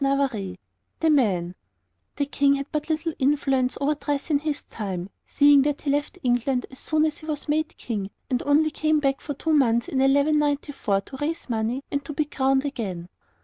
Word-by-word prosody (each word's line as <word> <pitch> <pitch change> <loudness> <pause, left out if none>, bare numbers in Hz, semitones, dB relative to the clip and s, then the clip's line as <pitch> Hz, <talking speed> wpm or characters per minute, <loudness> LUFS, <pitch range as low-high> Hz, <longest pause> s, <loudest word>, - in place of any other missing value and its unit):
a 275 0 +3
hood; 195 -7 -6 0.5
a 320 - +5
shoe}] 195 - +2 0.6
The 285 - 0
King 280 0 +2
had 275 0 -3
but 300 +1 -3
little 320 +1 -1
influence 270 -2 +1
over 285 +2 +2
dress 290 0 -3
in 285 - +3
his 295 -1 -3
time, 190 -3 -5 0.2
seeing 285 -1 +6
that 290 +1 -1
he 285 - +1
left 290 +5 -1
England 245 +1 +1
as 265 - -10
soon 310 0 +1
as 310 - -2
he 310 - -12
was 300 -1 -4
made 310 +2 -1
King, 205 -5 -4 0.2
and 250 -1 0
only 300 +2 +3
came 310 0 +1
back 275 -2 0
for 290 - -5
two 320 +4 -1
months 235 -5 +3
in 265 - -1
1194 285 -5 +2
to 265 - -10
raise 295 -2 -3
money 230 +4 -1
and 285 0 -1
to 295 - -6
be 305 +1 0
crowned 270 -1 +1
again. 190 -11 -4
280 Hz, 195 wpm, -25 LUFS, 250-295 Hz, 0.6 s, seeing